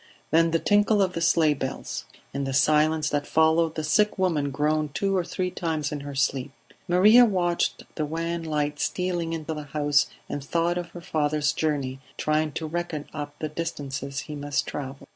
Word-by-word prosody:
Then 165 +1 +4
the 165 - +2
tinkle 205 +4 +3
of 190 -2 +2
the 170 - -3
sleigh 165 -2 +4
bells. 135 -2 -5 0.3
In 140 +1 -2
the 135 -1 -2
silence 155 +2 +3
that 145 -1 -1
followed, 160 0 +3
the 155 - -2
sick 210 +8 +2
woman 165 -7 +1
groaned 150 +1 0
two 195 -1 +1
or 185 - +2
three 180 +1 -3
times 160 -5 -2
in 150 - -3
her 140 0 -7
sleep; 135 0 0 0.4
Maria 205 +7 +7
watched 180 -6 +1
the 155 - -2
wan 165 +2 -2
light 150 -2 -2
stealing 175 -2 -1
into 160 -1 -3
the 150 - -5
house 145 -1 +2 0.2
and 145 - -4
thought 170 +4 0
of 175 -1 -6
her 175 - -10
father's 150 -2 0
journey, 140 -4 -1 0.2
trying 155 0 +1
to 160 - -3
reckon 160 -2 -3
up 145 -1 -5
the 155 - -3
distances 140 -3 -4
he 150 0 -8
must 145 -1 -1
travel. 135 -1 -6
155 Hz, 185 wpm, -26 LUFS, 145-170 Hz, 0.4 s, Maria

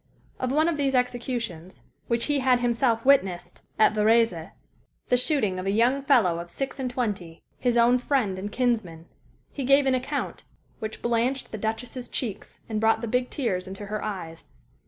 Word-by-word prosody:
Of 255 -1 -1
one 310 +4 +3
of 335 -3 0
these 275 -2 +1
executions, 240 -8 -3 0.2
which 235 0 +1
he 290 -1 +1
had 255 -2 +3
himself 235 -1 +1
witnessed 185 -10 +2 0.2
at 215 - +5
Varese 215 -6 +2 0.6
the - - +4
shooting 235 - +1
of 185 - -4
a - - +2
young 240 +6 +2
fellow 230 -12 +3
of 170 0 -7
six 270 +5 -5
and 260 -1 -2
twenty, 205 -10 -4 0.2
his 245 -1 +1
own 240 +2 +5
friend 245 -8 0
and 205 +2 -5
kinsman 215 -10 -1 0.5
he 280 - -5
gave 275 +2 +4
an 265 - +3
account 255 0 -3 0.4
which 220 0 -6
blanched 240 +3 0
the 220 - -5
Duchess's 235 +3 -4
cheeks 215 -5 -5
and 220 -1 -2
brought 225 0 +3
the 235 - -3
big 250 +2 0
tears 195 -9 -2
into 195 +2 -7
her 210 +1 -4
eyes. 165 -5 -6
235 Hz, 180 wpm, -26 LUFS, 200-255 Hz, 0.6 s, at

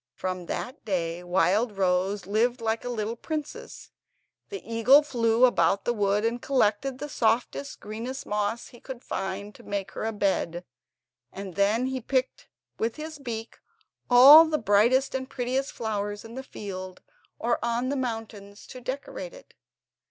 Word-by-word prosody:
From 185 -2 -4
that 255 +4 -5
day 175 -4 -2
Wildrose 190 +1 +1
lived 230 +5 +1
like 225 0 -1
a 245 - -4
little 225 -1 -2
princess. 305 +4 -6 0.6
The 400 - -7
eagle 230 +6 +5
flew 235 -3 +3
about 200 -5 +2
the 240 - +1
wood 205 0 +1
and 235 +1 -1
collected 255 0 +1
the 295 - -5
softest, 245 +2 -1
greenest 230 +6 -6
moss 210 +2 -2
he 240 - -15
could 260 -1 -9
find 200 +2 -4
to - - -15
make 200 -1 -4
her - - -6
a 225 - 0
bed, 190 -4 -1 0.7
and 195 -1 -7
then 205 +6 +2
he 260 0 -3
picked 260 +2 -1 0.3
with 225 +1 -1
his 310 0 -7
beak 230 -4 -6 0.5
all 275 +6 +10
the 315 -1 0
brightest 235 +4 +3
and 260 0 -3
prettiest 260 +2 -2
flowers 205 -1 -3
in 225 - -10
the 260 - -5
fields 185 -7 -8 0.3
or 235 +1 0
on 235 +2 0
the 285 - -1
mountains 225 -5 -5
to 255 - -10
decorate 275 - -6
it. - - -16
230 Hz, 155 wpm, -27 LUFS, 205-260 Hz, 0.7 s, all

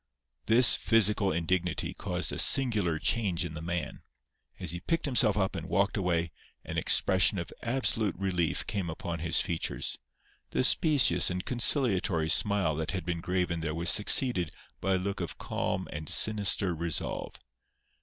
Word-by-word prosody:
This 115 +2 +5
physical 105 -3 +2
indignity 85 +1 -3
caused - - -3
a - - -2
singular 105 -11 +6
change 95 -2 -1
in 80 - -8
the 80 - -8
man. 85 0 -5 0.6
As - - -3
he 85 - -4
picked 165 - -3
himself 120 -6 +2
up 95 -2 -2
and 80 +2 -7
walked 100 0 0
away, 85 -4 -2 0.3
an - - -7
expression 95 +2 +2
of 85 -2 -7
absolute 115 -5 -1
relief 90 -3 -2
came 95 -4 -4
upon 85 +1 -6
his 80 0 0
features. 85 -2 -4 0.5
The - - -2
specious 150 +1 +3
and 90 0 -5
conciliatory 105 - 0
smile 100 -1 +1
that 80 +4 -4
had 95 -4 -5
been 85 -1 -4
graven 90 -1 -3
there 80 -1 -5
was 85 +1 +1
succeeded 105 - +4 0.2
by 95 0 -1
a - - 0
look 100 +2 -5
of 85 - -6
calm 95 - -4
and 75 0 -7
sinister 100 -3 +3
resolve. 85 -1 -5
95 Hz, 155 wpm, -28 LUFS, 85-105 Hz, 0.6 s, singular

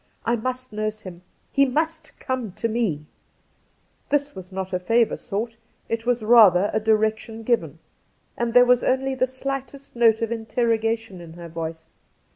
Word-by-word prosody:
I 235 - +2
must 255 +1 -4
nurse 215 0 -3
him! 180 -2 -10 0.3
He 275 - +4
must 315 +4 -2
come 255 -7 -3
to 230 - -2
me 215 -10 -1 0.5
!' - - -41
This 290 0 0
was 185 0 -10
not 190 0 -5
a 180 - +1
favour 230 +5 +2
sought, 225 +2 -4 0.3
it 230 +1 -3
was 245 -2 +1
rather 210 -4 +6
a 220 - +2
direction 220 +1 0
given, 235 +1 0 0.6
and 235 0 -2
there 245 0 +8
was 250 0 +4
only 265 +1 +1
the 255 0 +1
slightest 275 +1 -6
note 230 -1 +4
of 230 - -2
interrogation 225 -3 -1
in 165 -1 -11
her 170 0 -10
voice. 160 0 -6
225 Hz, 165 wpm, -23 LUFS, 210-250 Hz, 0.6 s, there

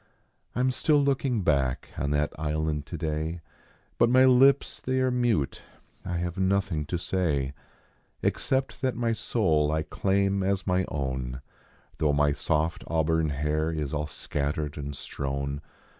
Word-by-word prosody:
I 125 - +1
m 130 0 +3
still 150 +4 +2
looking 135 -6 +1
back 70 -5 +1
on 70 - -1
that 75 0 0
island 75 -1 -1
today, 80 +2 -3 0.6
But 120 - +5
my 130 +1 +6
lips 130 +2 +4
they 130 0 0
are 130 0 +2
mute 120 - +1 0.4
I 90 -1 -3
have 85 +1 -3
nothing 95 -5 +1
to 90 - -1
say, 75 -7 0 0.7
Kxcept 135 0 0
that 130 -2 0
my 115 -1 0
soul 80 -10 +1
I 80 0 0
claim 100 +4 +1
as 95 0 0
my 90 -1 +2
own, 65 -2 -3 0.6
Tho 75 -2 +2
my 75 0 +3
soft 75 +3 0
auburn 80 -1 +1
hair 75 +2 0
is 75 -3 -3
all 75 0 -1
scatter 75 0 -2
d 75 - -10
and 70 0 -5
strovvn. 70 0 -3
80 Hz, 150 wpm, -27 LUFS, 75-100 Hz, 0.7 s, my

